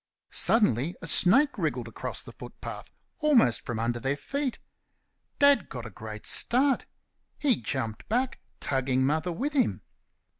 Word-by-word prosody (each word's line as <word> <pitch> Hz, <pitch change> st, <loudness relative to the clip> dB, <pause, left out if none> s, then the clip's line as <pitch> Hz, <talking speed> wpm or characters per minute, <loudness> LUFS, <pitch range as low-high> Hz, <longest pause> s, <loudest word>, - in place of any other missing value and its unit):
Suddenly 170 Hz, -, +2 dB
a -, -, -8 dB
snake 270 Hz, -, +4 dB
wriggled -, -, -2 dB
across -, -, -5 dB
the -, -, -11 dB
footpath, -, -, -9 dB, 0.3 s
almost 265 Hz, -, +3 dB
from 120 Hz, -, -5 dB
under 120 Hz, +2 st, -1 dB
their 135 Hz, +4 st, -2 dB
feet. 275 Hz, -, -3 dB, 0.8 s
Dad 285 Hz, -8 st, +4 dB
got 120 Hz, -3 st, -7 dB
a 115 Hz, -, -8 dB
great 110 Hz, +1 st, -9 dB
start. 265 Hz, +2 st, +3 dB, 0.5 s
He 270 Hz, -6 st, +2 dB
jumped 115 Hz, -5 st, -4 dB
back, 250 Hz, +4 st, -1 dB, 0.2 s
tugging 130 Hz, -1 st, 0 dB
Mother 155 Hz, +5 st, 0 dB
with 275 Hz, -, -3 dB
him. 270 Hz, -4 st, 0 dB
165 Hz, 140 wpm, -27 LUFS, -, 0.8 s, snake